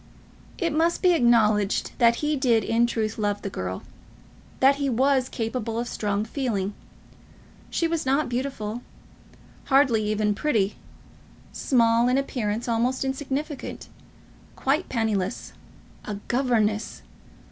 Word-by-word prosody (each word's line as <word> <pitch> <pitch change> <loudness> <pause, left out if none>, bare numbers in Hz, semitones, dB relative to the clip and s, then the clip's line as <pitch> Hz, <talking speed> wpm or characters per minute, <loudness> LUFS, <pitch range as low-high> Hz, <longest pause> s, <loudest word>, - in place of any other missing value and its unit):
It 335 -4 -1
must 330 +4 +1
be 360 -1 +6
acknowledged 220 - +3
that 235 -1 +5
he 300 0 +1
did, 240 -5 +2
in 230 +3 +2
truth, 220 -2 -2
love 205 -1 -1
the 200 - -4
girl, 95 - -4 0.8
that 275 +1 +5
he 280 -1 0
was 260 +1 +2
capable 225 -1 -3
of 235 - -1
a - - -7
strong 205 0 -1
feeling. 220 -6 -2 1.0
She 335 - 0
was 330 -1 -1
not 275 +3 +1
beautiful, 240 -3 -3 0.8
hardly 265 -5 +3
even 210 0 +1
pretty, 210 -5 0 0.8
small, 235 -2 +3
in 250 +1 +3
appearance 235 -4 -2
almost 245 +3 0
insignificant, 275 +2 -4 0.7
quite 290 +7 0
penniless, 220 -4 -2 0.5
a 210 - -4
governess! 230 -4 0
240 Hz, 125 wpm, -25 LUFS, 215-270 Hz, 1.0 s, be